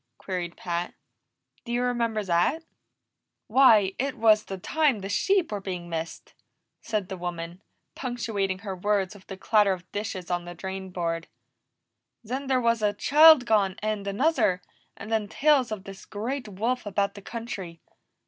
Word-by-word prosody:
queried 175 -2 -5
Pat. 175 0 -3 0.7
"Do 235 - -7
you 240 +1 +1
remember 235 -3 0
that?" 185 - +1 0.8
"Why, 220 -6 +5
it 275 +1 -1
was 215 -1 +4
the 195 - -5
time 280 - +1
the 195 - -5
sheep 370 - +2
were 205 -1 -3
being 180 -3 -5
missed," 165 0 -5 0.5
said 210 -4 -2
the 190 - -6
woman, 175 0 -5 0.3
punctuating 225 -7 -2
her 195 -2 -3
words 195 0 0
with 205 -2 -16
the 195 - -7
clatter 205 -1 +3
of 180 -1 -10
dishes 200 -4 -4
on 175 0 -1
the 175 0 -8
drainboard. 180 -3 -4 1.0
"Then 260 +5 -4
there 260 -1 +2
was 230 -2 +1
a 210 -1 +2
child 305 0 +7
gone, 205 -5 +2
and 215 -2 -2
another, 200 - +1 0.3
and 220 - -8
then 220 -2 +1
tales 275 0 +3
of 210 -3 -4
this 195 -1 -10
great 240 +5 -4
wolf 220 +4 -2
about 200 0 0
the 200 - -10
country. 195 -7 -6
205 Hz, 160 wpm, -26 LUFS, 185-235 Hz, 1.0 s, child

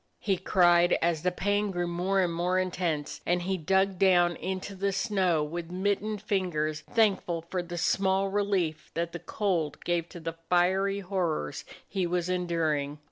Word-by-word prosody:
he 195 -3 +1
cried, 175 -1 +4
as 165 -2 +1
the 180 +2 +1
pain 205 +3 0
grew 175 -2 -1
more 180 +3 0
and 175 -2 0
more 175 +2 0
in 185 0 0
tense, 160 -5 -2
and 175 0 0
he 190 +2 0
dug 190 +2 +1
down 175 -3 +4
into 190 +1 -4
the 195 +1 -1
snow 190 -5 +1
with 170 +3 -4
his 180 +1 -6
mittened 205 +1 -1
fingers, 160 -7 -1
thankful 195 -7 +2
for 185 - 0
the 175 0 -7
small 190 +3 +2
relief 195 -6 -1
that 170 0 -1
the 175 - -6
cold 175 -9 -1
gave 170 -1 0
to 175 - -9
the 165 0 -4 0.2
fiery 190 +3 +2
horrors 175 - -2 0.2
he 190 -3 -1
was 175 0 -1
enduring. 160 -5 0
180 Hz, 175 wpm, -28 LUFS, 170-195 Hz, 0.2 s, cried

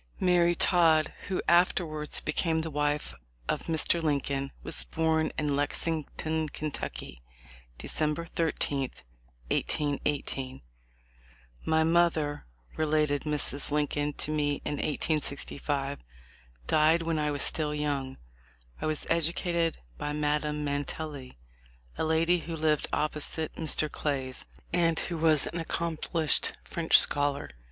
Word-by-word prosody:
Mary 175 -1 +3
Todd, 165 -4 +3
who 190 - -2
afterwards 170 -3 +2
became 165 -2 0
the 160 0 -5
wife 150 0 -1 0.3
of - - -2
Mr. 165 +1 +2
Lincoln, 140 -3 -1
was - - +1
born 160 -1 0
in 150 -2 0
Lexington, 155 +1 -1
Kentucky, 145 - -6 0.6
December 155 +2 -2
13, 145 -5 -1 0.6
1818. 140 -2 -2 1.0
"My 160 0 +3
mother," 160 - +1 0.3
related 150 -2 +1
Mrs. 145 -2 -1
Lincoln 145 0 -1
to 150 - -2
me 145 -1 0
in 145 - -2
1865, 145 -2 -2 0.7
"died 155 - +3
when 165 -1 -1
I 150 0 0
was 145 -1 0
still 150 -2 0
young. 140 -3 -2 0.6
I - - -1
was 155 -1 -2
educated 170 0 0 0.2
by 150 - -3
Madame 150 0 -1
Mantelli, 145 - -5 0.6
a - - -2
lady 165 +2 +2
who 165 0 -6
lived 155 -2 +1
opposite 155 +1 -2
Mr. 155 -1 -1
Clay's, 135 -4 -2 0.3
and 165 -2 +2
who 170 - -2
was 155 -2 +8
an 170 -1 -3
accom 165 -1 -3
plished 160 -3 +5
French 165 -1 +3
scholar. 145 - +1
155 Hz, 115 wpm, -28 LUFS, 145-165 Hz, 1.0 s, was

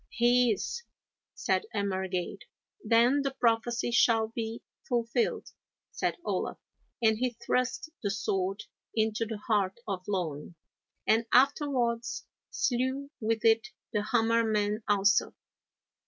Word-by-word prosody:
'He 240 0 +4
is,' 345 - -3 0.5
said 435 - 0
Emergaid. 190 -2 -2 0.4
'Then 240 +5 +4
the 275 -1 -2
prophecy 235 +1 +1
shall 225 -2 +4
be 225 0 -5 0.3
fulfilled,' 235 -1 0 0.4
said - - -1
Olaf, - - -2 0.5
and 220 -1 +4
he 250 -2 -1
thrust 285 +7 0
the 205 - -1
sword 195 -1 -1 0.3
into 220 0 +1
the 220 -1 -4
heart 205 -3 0
of 195 -3 -2
Loan, 170 -5 -3 0.5
and 225 +1 +3
afterwards 250 -3 +2 0.2
slew 260 +3 -1
with 225 0 -1
it 225 0 +4 0.3
the 210 - +1
Hammer 230 +1 +3
man 210 -1 0
also. 205 0 +3
225 Hz, 115 wpm, -29 LUFS, 205-240 Hz, 0.5 s, He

